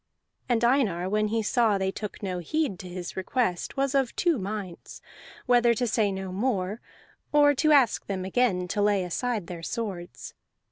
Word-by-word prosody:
And 240 -1 +2
Einar, 220 -9 +2
when 215 +1 +1
he 225 +1 -1
saw 220 -2 +2
they 190 0 -1
took 210 +1 -7
no 185 -2 -2
heed 240 - -1
to 180 - -8
his 175 -1 -6
request, 190 +1 -1
was 275 0 +1
of 270 -3 +1
two 340 -7 +1
minds: 195 -3 -6 0.5
whether 240 -2 +4
to 245 - 0
say 215 -3 +1
no 190 -1 -5
more, 205 0 -1 0.5
or 290 -1 +5
to 310 +3 +2
ask 275 -5 +4
them 190 -2 -3
again 190 -4 +1
to 205 - -1
lay 205 -2 +2
aside 215 +3 -2
their 170 -1 -7
swords. 190 -3 -5
210 Hz, 175 wpm, -27 LUFS, 185-245 Hz, 0.5 s, or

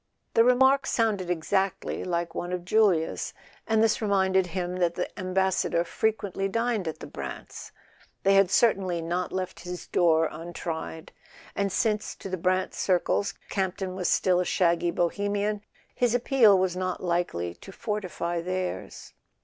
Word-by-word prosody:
The 230 - +6
remark 265 +3 +4
sounded 210 -6 0
exactly 190 +3 -1
like 170 -2 -2
one 175 - -4
of 180 -1 -3
Julia's, 190 -5 +2 0.3
and 220 0 +3
this 225 0 +2
reminded 190 -3 +2
him 180 0 -3
that 175 -2 +1
the 180 - -1
Ambassador 185 -2 +1
frequently 200 +1 -1
dined 230 -2 -1
at 160 - -3
the - - -9
Brants'. - - -8 0.5
They 195 - +4
had 195 -2 +5
certainly 195 -6 +2
not 175 +2 -2
left 185 -1 -4
his 180 0 -7
door 165 -2 +3
untried; 165 0 -6 0.4
and 200 -1 0
since, 215 0 0
to 195 - -8
the 185 - -2
Brant 185 +2 0
circles. 190 +2 0
Camp 190 -2 -1
ton 190 -2 -4
was 185 -1 -1
still 180 -1 +3
a - - +2
shaggy 175 -1 +2
Bohemian, 205 +4 -1 0.3
his 245 -1 +1
appeal 240 -5 +5
was 185 -1 0
not 185 0 -3
likely 170 - -1
to 195 - -13
fortify 180 -5 -3
theirs. 185 +1 -4
185 Hz, 150 wpm, -27 LUFS, 175-205 Hz, 0.5 s, The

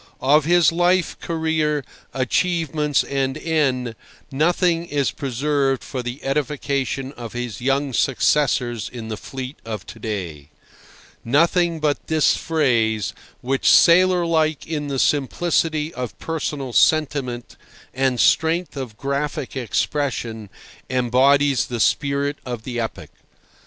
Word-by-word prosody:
Of 145 +3 +4
his 175 -2 +4
life, 175 +1 +2
career, 160 -3 -1 0.3
achievements, 150 +1 0
and 135 0 -2
end 135 -7 0 0.4
nothing 170 +3 +1
is 145 -3 0
preserved 135 0 -1
for 130 - -5
the 125 +3 -6
edification 135 -1 -2
of 120 -5 -9
his 120 -3 -5
young 135 +1 0
successors 125 -4 +1
in 115 -3 -7
the 110 - -3
fleet 130 +4 -7
of 110 -3 -6
to 115 - -11
day—nothing 115 - -2
but 150 -2 -1
this 160 -2 +3
phrase, 115 - 0 0.3
which, 135 +2 +1
sailor 180 0 +6
like 155 -3 +1
in 150 -2 -3
the 140 -1 -3
simplicity 155 +3 +1
of 125 -3 -6
personal 150 -5 -4
sentiment 135 -6 +1 0.4
and 130 -1 0
strength 165 +1 +2
of 125 -6 -6
graphic 140 -1 -3
expression, 120 -4 -2 0.4
embodies 130 +2 +3
the 120 -1 -4
spirit 140 +4 +1
of 120 -3 -6
the 120 -1 -4
epoch. 115 -1 -5
140 Hz, 115 wpm, -21 LUFS, 125-155 Hz, 0.4 s, sailor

